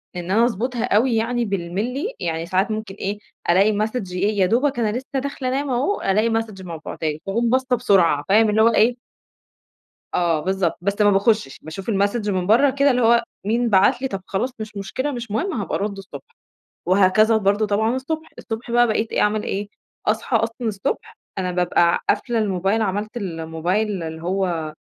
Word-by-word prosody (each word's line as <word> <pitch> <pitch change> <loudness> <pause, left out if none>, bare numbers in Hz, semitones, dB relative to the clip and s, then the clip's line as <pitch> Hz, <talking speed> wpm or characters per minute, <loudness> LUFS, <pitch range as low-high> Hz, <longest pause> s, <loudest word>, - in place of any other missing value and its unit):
إن 180 +1 -4
أنا 230 +3 +4
أضبطها 240 +1 -2
أوي 230 +4 +2
يعني 235 +1 0
بالملي، 205 - -3
يعني 165 0 -2
ساعات 190 +5 0
ممكن 215 -3 -4
إيه 205 +1 -4 0.3
ألاقي 200 +4 +4
Message 215 -3 -2
إيه 200 +3 0
يا 185 - +5
دوبك 245 +6 +1
أنا 220 0 0
لسّه 265 +1 -4
داخلة 275 -1 -4
أنام 275 +2 -1
أهو، 270 +12 0
ألاقي 215 +4 +2
Message 195 -4 -10
مبعوته 165 -1 -5
لي 150 0 -2
فاقوم 230 +4 0
باصة 260 0 +2
بسرعة، 185 -11 +3
فاهم 215 +2 +5
اللي 215 +1 +3
هو 230 - +6
إيه 235 +3 +4 1.2
آه، 170 -3 +1
بالضبط 190 -2 0
بس 200 +3 -1
ما 205 0 +5
باخشش، 200 - +1
باشوف 185 +8 -5
الMessage 205 +2 0
من 185 -2 -1
برّه 260 +6 +5
كده 280 +1 +3
اللي 250 - +1
هو 235 0 +4 0.2
مين 235 +3 +1
بعت 195 +4 +4
لي، 265 - 0
طب 195 -6 -5
خلاص 205 +6 -1
مش 215 -1 -7
مشكلة 260 +9 -3
مش 235 -4 -6
مهم 365 - -1
هابقى 210 - -3
أرد 200 -1 -2
الصبح، 195 - -11 0.5
وهكذا 200 +4 +4
برضه 205 +1 +1
طبعًا 220 +4 +1
الصبح، 315 +5 -4
الصبح 230 +1 -6
بقى 240 0 +4
بقيت 220 0 -1
إيه - - +1
أعمل 210 0 +1
إيه، 200 +1 -3 0.4
أصحى 225 +2 +1
أصلًا 225 +1 -3
الصبح 200 -2 -3 0.2
أنا 185 -1 -1
بابقى 175 -1 +2
قافلة 235 -2 +1
الموبايل، 195 +1 0
عملت 210 +3 -2
الموبايل 175 +2 -2
اللي 160 0 -6
هو 175 -4 -1
210 Hz, 185 wpm, -21 LUFS, 190-235 Hz, 1.2 s, هو